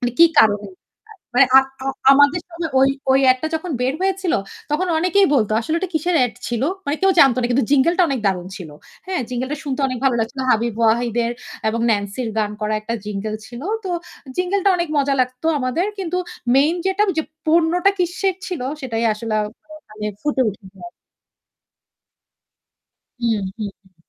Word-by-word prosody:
মানে 245 -1 -1
কি 335 - +9 0.2
কারণে? 205 -1 +2 0.7
মানে 270 - +7
আ - - +9 0.2
আ - - -4 0.3
আমাদের 285 +5 +4
সময় 335 -2 -4
ওই 270 - +5 0.2
ওই 270 - +4
এড 255 - +3
টা - - 0
যখন 340 +2 -6
বের 255 +2 0
হয়েছিল, 380 -2 0 0.4
তখন 320 +5 0
অনেকেই 370 +3 +3
বলত 215 -6 +2
যে, - - +2
"আসলে 315 +8 -2
ওটা 370 0 -4
কিসের 335 +3 +1
এড 245 - -4
ছিল?" 240 0 -2 0.2
মানে 285 +2 0
কেউ 385 - +5
জানত 270 -3 +6
না। 240 - +1
কিন্তু 250 +1 +2
jingle 290 +5 +3
টা - - +6
অনেক 270 -5 -1
দারুন 180 -2 0
ছিল। 165 -5 -9 0.4
হ্যাঁ? 375 -4 -2
jingle 255 +2 -3
টা 300 - -2
শুনতে 275 -1 -3
অনেক 255 -2 -4
ভালো 265 -2 +3
লাগছিল। 230 +4 -3
হাবিব 230 0 +1
ওয়াহিদ 230 +1 +2
এর 235 - -2 0.4
এবং 230 +1 -1
ন্যান্সির 205 +3 -1
গান 210 -1 0
করা 215 0 -1
একটা 230 +2 -4
jingle 210 +1 -3
ছিল। 240 0 -9 0.2
তো 370 - -3 0.5
jingle 365 +2 0
টা 395 - +5
অনেক 345 -1 -2
মজা 275 0 +2
লাগতো 255 +4 -2
আমাদের 260 +8 -1
কিন্তু 360 -2 -3 0.4
মেইন 295 +5 +4
যেটা 385 +2 +1
ঐযে 320 -4 0 0.2
পণ্যটা 335 +4 +3
কিসের 360 +2 0
ছিল, 360 -6 -4 0.2
সেটাই 235 -4 -2
আসলে 215 0 -4
আ - - 0
মানে 275 +7 -20
ওখানে 215 -5 -8
ফুটে 295 -3 +1
উঠেনি 195 -1 -10
আর। - - -19 2.3
হুম, 230 -2 +1
হুম, - - -3
হুম, 210 -2 -3
হুম। 190 -1 -28
265 Hz, 190 wpm, -20 LUFS, 225-335 Hz, 2.3 s, কি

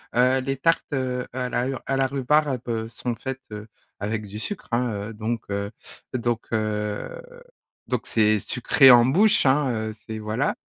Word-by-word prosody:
heu, 130 +2 +4
les 135 0 -2
tartes, 165 +4 +2
heu, 125 -2 -1
à 125 -1 -2
la 125 +1 0
ur 135 -2 -4
à 135 - 0
la 135 - +3
rhubarbe 130 -4 0
sont 120 +1 -4
faites, 130 +2 -6
heu, 105 +1 -7 0.3
avec 105 +1 -3
du 100 +2 -8
sucre 200 - -5
hein, 120 0 +1 0.2
heu, 115 - -8
donc 110 +1 -3
heu 100 +1 -2 0.4
donc 120 -2 -1
heu, 105 - -2 0.7
donc - - -2
c'est 110 -1 +3
sucré 130 +5 +5
en 120 -1 +8
bouche 200 - +4
hein, 135 +1 +3
heu, 110 -2 -3
c'est 110 0 -5
voilà. 110 +6 -1
120 Hz, 175 wpm, -24 LUFS, 110-135 Hz, 0.7 s, en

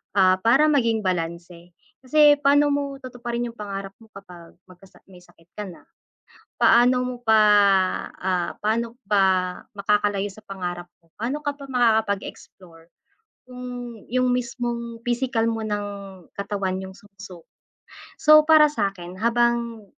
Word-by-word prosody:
Ah, 185 -1 +4
para 265 +9 +4
maging 230 -6 +1
balanse, 170 -1 -5 0.2
kasi 290 +2 +4
pano 290 0 +3
mo 280 -1 -2
tutuparin 240 -1 -5
'yong 235 -1 -7
pangarap 195 -1 -6
mo 225 - -18
kapag 175 -3 -13
magka 185 +1 -18 0.2
may 180 - -14
sakit 175 -1 -24
ka 210 - -4
na? 175 - -13 0.8
Paano 245 +2 +5
mo 250 0 -5
pa, 220 -2 +4 0.7
ah 180 -2 -2
pano 230 +3 -2
pa 190 -3 +1
makakalayo 205 -1 0
sa 215 - -15
pangarap 175 -3 -6
mo? 165 -1 -35
Pano 245 +7 -3
ka 290 - -1
pa 275 -1 -12
makakapag-explore, 200 -7 -2 0.5
kung 245 -2 -8
yung 255 +1 +1
mismong 235 -1 -4
pisikal 240 -1 -1
mo 225 - -4
ng 205 -1 -2 0.5
katawan 195 -2 -3
yung 190 0 -9
sumuko? 195 -4 -14 0.7
So, 305 0 +7
para 305 -2 +6
sakin, 190 -6 -4
habang, 235 -1 0
220 Hz, 130 wpm, -23 LUFS, 190-245 Hz, 0.8 s, So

